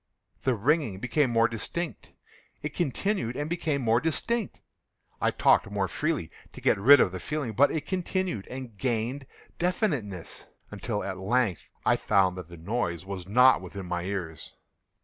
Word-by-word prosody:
The 130 Hz, -2 st, +1 dB
ringing 135 Hz, -, +1 dB
became 125 Hz, +4 st, +1 dB
more 115 Hz, 0 st, +4 dB
distinct:—it 150 Hz, +3 st, -6 dB
continued 165 Hz, -, -1 dB
and 145 Hz, +2 st, -2 dB
became 155 Hz, -5 st, -1 dB
more 115 Hz, +1 st, +3 dB
distinct: 220 Hz, +7 st, -1 dB, 0.6 s
I -, -, +3 dB
talked -, -, +3 dB
more 100 Hz, -1 st, -1 dB
freely 150 Hz, -, -2 dB, 0.2 s
to -, -, -9 dB
get -, -, +2 dB
rid 140 Hz, +8 st, +8 dB
of 90 Hz, -, +3 dB
the 95 Hz, -, -5 dB
feeling: 145 Hz, -4 st, -3 dB
but 140 Hz, +7 st, +5 dB
it 155 Hz, -2 st, -3 dB
continued 185 Hz, -, -2 dB
and 130 Hz, -4 st, -7 dB
gained 125 Hz, +2 st, -1 dB, 0.3 s
definiteness—until, 115 Hz, -, -3 dB
at 95 Hz, -1 st, -4 dB
length, 105 Hz, -2 st, 0 dB, 0.2 s
I -, -, +4 dB
found 95 Hz, -3 st, +2 dB
that 85 Hz, -2 st, -9 dB
the 85 Hz, -, -10 dB
noise 85 Hz, -1 st, -2 dB
was 95 Hz, -2 st, -6 dB
not 125 Hz, +4 st, +6 dB
within 95 Hz, +1 st, -7 dB
my 90 Hz, 0 st, -2 dB
ears. 90 Hz, -4 st, -5 dB
120 Hz, 150 wpm, -28 LUFS, 100-150 Hz, 0.6 s, rid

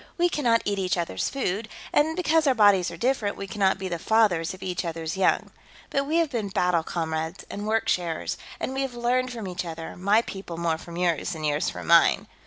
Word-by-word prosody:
"We 350 Hz, 0 st, +3 dB
cannot 235 Hz, -8 st, +2 dB
eat 200 Hz, -1 st, 0 dB
each 185 Hz, -1 st, 0 dB
others' 170 Hz, -, -1 dB
food, 220 Hz, -5 st, -2 dB, 0.2 s
and 315 Hz, +2 st, +3 dB
because 325 Hz, -3 st, +2 dB
our 265 Hz, -, +4 dB
bodies 200 Hz, -5 st, +5 dB
are 170 Hz, -, -8 dB
different, 230 Hz, -1 st, 0 dB
we 195 Hz, -, -5 dB
cannot 195 Hz, 0 st, +1 dB
be 190 Hz, -, -4 dB
the 170 Hz, -2 st, -3 dB
fathers 190 Hz, -6 st, +2 dB
of 185 Hz, -, -9 dB
each 180 Hz, -2 st, -2 dB
others' 165 Hz, -1 st, -4 dB
young. 190 Hz, -1 st, +1 dB, 0.4 s
But 275 Hz, 0 st, 0 dB
we 310 Hz, -, 0 dB
have 335 Hz, -3 st, +2 dB
been 220 Hz, -5 st, -2 dB
battle 180 Hz, -3 st, +2 dB
comrades, 160 Hz, +1 st, -3 dB
and 205 Hz, +1 st, -5 dB
worksharers, 185 Hz, -7 st, 0 dB, 0.2 s
and 260 Hz, -, -3 dB
we 270 Hz, -, -1 dB
have 265 Hz, -3 st, -3 dB
learned 250 Hz, +1 st, 0 dB
from 225 Hz, -5 st, -6 dB
each 180 Hz, 0 st, -3 dB
other, 165 Hz, -1 st, -7 dB
my 200 Hz, +5 st, +3 dB
people 190 Hz, -6 st, -7 dB
more 165 Hz, -1 st, 0 dB
from 170 Hz, 0 st, -9 dB
yours 175 Hz, 0 st, 0 dB
than 160 Hz, -2 st, -7 dB
yours 150 Hz, -1 st, +1 dB
from -, -, -7 dB
mine. -, -, +5 dB
195 Hz, 215 wpm, -26 LUFS, 170-240 Hz, 0.4 s, bodies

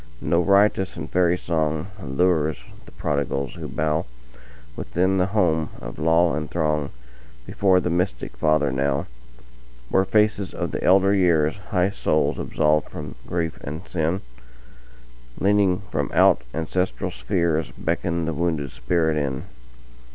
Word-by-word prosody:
No 85 Hz, -, +1 dB
riotous 100 Hz, 0 st, +3 dB
and -, -, -5 dB
fairy 90 Hz, -1 st, +2 dB
songAllures 80 Hz, -1 st, 0 dB, 0.3 s
the -, -, -13 dB
prodigals 70 Hz, -3 st, -2 dB
who -, -, -7 dB
bowWithin 75 Hz, +5 st, -3 dB
the 90 Hz, -, +2 dB
home 80 Hz, -7 st, +2 dB
of -, -, -8 dB
law, 80 Hz, +1 st, +3 dB
and 75 Hz, +1 st, -3 dB
throngBefore 75 Hz, +3 st, -1 dB
the 90 Hz, -, -1 dB
mystic 90 Hz, -7 st, -2 dB
Father 75 Hz, +2 st, +2 dB
now, 70 Hz, +1 st, 0 dB, 0.8 s
Where 95 Hz, -, +3 dB
faces 105 Hz, -1 st, +1 dB
of 85 Hz, -3 st, -3 dB
the 75 Hz, -, -4 dB
elder 95 Hz, +2 st, +5 dB
years, 85 Hz, -5 st, +3 dB
High 90 Hz, 0 st, +2 dB
souls 75 Hz, -6 st, 0 dB
absolved 75 Hz, -1 st, +1 dB
from 75 Hz, -2 st, -7 dB
grief 85 Hz, -2 st, -2 dB
and 80 Hz, +6 st, -6 dB
sin, 85 Hz, +2 st, -1 dB, 1.2 s
Leaning 100 Hz, -1 st, +3 dB
from 75 Hz, -2 st, -1 dB
out -, -, +5 dB
ancestral 85 Hz, +5 st, -2 dB
spheresBeckon 85 Hz, +4 st, -1 dB
the 80 Hz, -, -2 dB
wounded 75 Hz, -4 st, -1 dB
spirit 80 Hz, +5 st, 0 dB
in. 70 Hz, -3 st, -2 dB
80 Hz, 120 wpm, -23 LUFS, 75-90 Hz, 1.2 s, elder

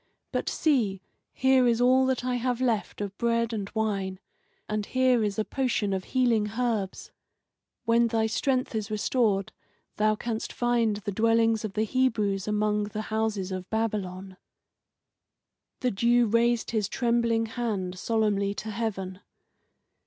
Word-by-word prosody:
But -, -, -1 dB
see, 220 Hz, -, +1 dB, 0.3 s
here 260 Hz, -1 st, +3 dB
is 235 Hz, -1 st, +2 dB
all 260 Hz, +1 st, +4 dB
that 255 Hz, -1 st, -1 dB
I 250 Hz, -1 st, 0 dB
have 245 Hz, 0 st, -1 dB
left 230 Hz, -5 st, -1 dB
of 200 Hz, -1 st, -4 dB
bread 230 Hz, -1 st, +1 dB
and 205 Hz, -2 st, -3 dB
wine, 195 Hz, -4 st, -1 dB, 0.5 s
and 210 Hz, 0 st, -1 dB
here 255 Hz, -3 st, +3 dB
is 205 Hz, -1 st, -1 dB
a 215 Hz, -, 0 dB
potion 240 Hz, -7 st, 0 dB
of 190 Hz, -1 st, -3 dB
healing 230 Hz, -5 st, +1 dB
herbs. 225 Hz, -6 st, -2 dB, 0.7 s
When 235 Hz, +1 st, +4 dB
thy 225 Hz, -1 st, +1 dB
strength 255 Hz, +5 st, 0 dB
is 215 Hz, -1 st, -3 dB
restored 215 Hz, -2 st, +1 dB, 0.5 s
thou 215 Hz, 0 st, +3 dB
canst 225 Hz, 0 st, -4 dB
find 235 Hz, -3 st, +1 dB
the 205 Hz, 0 st, -4 dB
dwellings 225 Hz, +1 st, +2 dB
of 215 Hz, -3 st, -4 dB
the 215 Hz, -, +1 dB
Hebrews 215 Hz, -5 st, 0 dB
among 210 Hz, 0 st, +1 dB
the 210 Hz, +1 st, -4 dB
houses 215 Hz, -4 st, -1 dB
of 185 Hz, 0 st, -5 dB
Babylon." 195 Hz, -4 st, -3 dB, 1.4 s
The 250 Hz, -, +1 dB
Jew 235 Hz, +4 st, +3 dB
raised 230 Hz, +1 st, +2 dB
his 215 Hz, -3 st, 0 dB
trembling 235 Hz, -2 st, +1 dB
hand 210 Hz, -6 st, -3 dB
solemnly 205 Hz, -3 st, 0 dB
to 220 Hz, +1 st, -5 dB
heaven. 195 Hz, -4 st, -3 dB
220 Hz, 145 wpm, -27 LUFS, 205-240 Hz, 1.4 s, all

